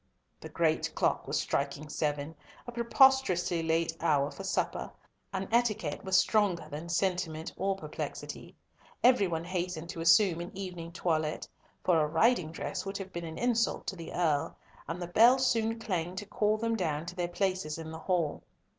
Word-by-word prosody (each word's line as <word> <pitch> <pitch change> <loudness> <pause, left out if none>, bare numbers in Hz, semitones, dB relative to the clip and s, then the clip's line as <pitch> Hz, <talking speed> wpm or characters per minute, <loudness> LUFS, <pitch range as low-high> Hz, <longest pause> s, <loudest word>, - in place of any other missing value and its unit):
The - - -9
great - - 0
clock - - +1
was - - 0
striking 155 +2 -2
seven, 150 0 -2 0.3
a 240 - -6
preposterously 235 -8 +3
late 165 0 0
hour 150 -3 +2
for 195 - -8
supper, 190 - -1 0.4
and 190 0 -3
etiquette 220 -10 +1
was 190 -1 +3
stronger 195 -5 +2
than 155 +4 -6
sentiment 175 -3 -1
or 195 +1 0
perplexity. 195 - -6 0.5
Every 245 -5 +5
one 165 -2 -2
hastened 175 -2 -3
to 165 - -5
assume 170 +1 +5
an 175 +2 -8
evening 175 -4 -6
toilette, 160 -3 -1 0.4
for 175 -3 +4
a 150 - +2
riding 165 +1 +2
dress 185 +3 -4
would 195 +1 -4
have 190 -1 -8
been 170 0 -4
an 160 0 -7
insult 235 -2 +1
to - - -3
the 165 -2 -8
Earl, 155 -5 0 0.3
and 165 +3 -4
the 175 - -3
bell 230 +9 +6
soon 230 -3 +1
clanged 185 -5 -3
to 205 - -4
call 210 +1 +1
them 230 +1 0
down 160 -6 -1
to 180 +1 -7
their 175 -1 -1
places 180 -3 -1
in 160 -1 -7
the 160 - -7
hall. 165 -3 0
180 Hz, 175 wpm, -30 LUFS, 165-200 Hz, 0.5 s, bell